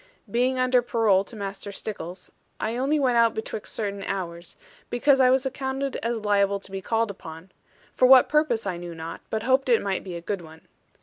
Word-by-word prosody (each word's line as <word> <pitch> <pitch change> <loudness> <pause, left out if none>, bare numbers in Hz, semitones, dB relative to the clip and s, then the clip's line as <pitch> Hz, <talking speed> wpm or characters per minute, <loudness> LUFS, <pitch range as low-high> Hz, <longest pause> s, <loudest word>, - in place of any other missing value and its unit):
Being 250 +3 +1
under 255 -1 +3
parole 225 -5 +2
to 235 - -11
Master 200 -1 -6
Stickles, 185 -3 -7 0.3
I 225 +2 -2
only 275 +5 +1
went 255 -4 +2
out 230 -1 +4
betwixt 220 -1 -5
certain 200 -2 -3
hours; 175 -3 -5 0.3
because 270 +3 +3
I 255 -1 +6
was 260 +1 +3
accounted 265 0 -3
as 230 0 -2
liable 200 -2 +1
to 195 - -8
be 195 0 -4
called 225 +2 0
upon; 165 -1 -11 0.4
for 255 - +4
what 260 -1 +8
purpose 300 -8 +1
I 185 -3 -2
knew 175 -1 -7
not, 165 +1 -7
but 220 0 -2
hoped 260 +1 +2
it 235 - +5
might 195 -1 -2
be 185 -3 -7
a - - -4
good 195 +2 -3
one. 160 -1 -13
220 Hz, 200 wpm, -25 LUFS, 195-255 Hz, 0.4 s, what